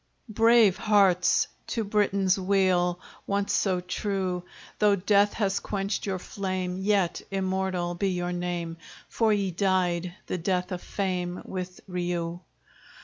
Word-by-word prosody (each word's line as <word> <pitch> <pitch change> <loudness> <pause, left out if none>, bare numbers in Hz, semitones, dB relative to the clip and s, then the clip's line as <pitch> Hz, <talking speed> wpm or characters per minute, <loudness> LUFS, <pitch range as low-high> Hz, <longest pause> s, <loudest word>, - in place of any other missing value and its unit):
Brave 225 -2 +5
hearts, 195 -4 +3 0.2
to 225 - -1
Britain's 200 -2 +2
weal 185 -2 +2 0.3
Once 200 0 0
so 185 -3 +1
true! 185 0 -2 0.4
Though 205 -1 +5
death 200 +2 +3
has 200 -2 0
quenched 200 0 -3
your 190 -1 -1
flame, 185 -1 -3
Yet 195 -3 +1
immortal 190 -2 -1
be 195 +3 0
your 180 -1 -2
name! 175 -2 -3 0.3
For 225 -2 +2
ye 200 -3 +1
died 180 -1 0
the 180 - -3
death 180 +1 -1
of 180 -1 -4
fame 180 -2 -3
With 185 -1 -6
Riou! 175 -2 -2
185 Hz, 130 wpm, -27 LUFS, 180-200 Hz, 0.4 s, Brave